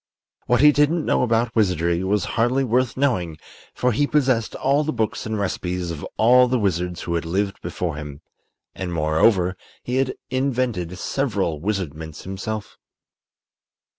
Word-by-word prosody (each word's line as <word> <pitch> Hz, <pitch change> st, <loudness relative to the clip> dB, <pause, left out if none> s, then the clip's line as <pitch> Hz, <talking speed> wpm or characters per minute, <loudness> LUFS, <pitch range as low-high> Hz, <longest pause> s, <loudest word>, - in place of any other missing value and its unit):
What 125 Hz, 0 st, +3 dB
he 150 Hz, 0 st, +8 dB
didn't 150 Hz, +3 st, +2 dB
know -, -, +2 dB
about 115 Hz, -1 st, +1 dB
wizardry 90 Hz, -4 st, +1 dB
was 100 Hz, 0 st, +1 dB
hardly 120 Hz, +4 st, +2 dB
worth 125 Hz, 0 st, +1 dB
knowing, 95 Hz, -, 0 dB, 0.4 s
for 125 Hz, -, +1 dB
he 145 Hz, +6 st, +1 dB
possessed 130 Hz, -7 st, +1 dB
all 140 Hz, +3 st, +2 dB
the 155 Hz, -, -1 dB
books 110 Hz, -1 st, -2 dB
and 110 Hz, 0 st, -2 dB
recipes 90 Hz, -3 st, -2 dB
of 80 Hz, -3 st, -6 dB
all 125 Hz, +3 st, +6 dB
the 125 Hz, +1 st, +1 dB
wizards 90 Hz, -4 st, -1 dB
who 85 Hz, -, -3 dB
had 85 Hz, -, 0 dB
lived 95 Hz, +4 st, -2 dB
before 85 Hz, -4 st, -3 dB
him; 75 Hz, 0 st, -8 dB, 0.5 s
and, 95 Hz, -2 st, -5 dB
moreover, 85 Hz, +4 st, +2 dB, 0.3 s
he 125 Hz, +1 st, -2 dB
had 135 Hz, -1 st, 0 dB, 0.2 s
invented 125 Hz, -9 st, -1 dB
several 100 Hz, -, -1 dB
wizardments 80 Hz, -6 st, -4 dB
himself. 100 Hz, +3 st, -5 dB
105 Hz, 150 wpm, -22 LUFS, 90-125 Hz, 0.5 s, he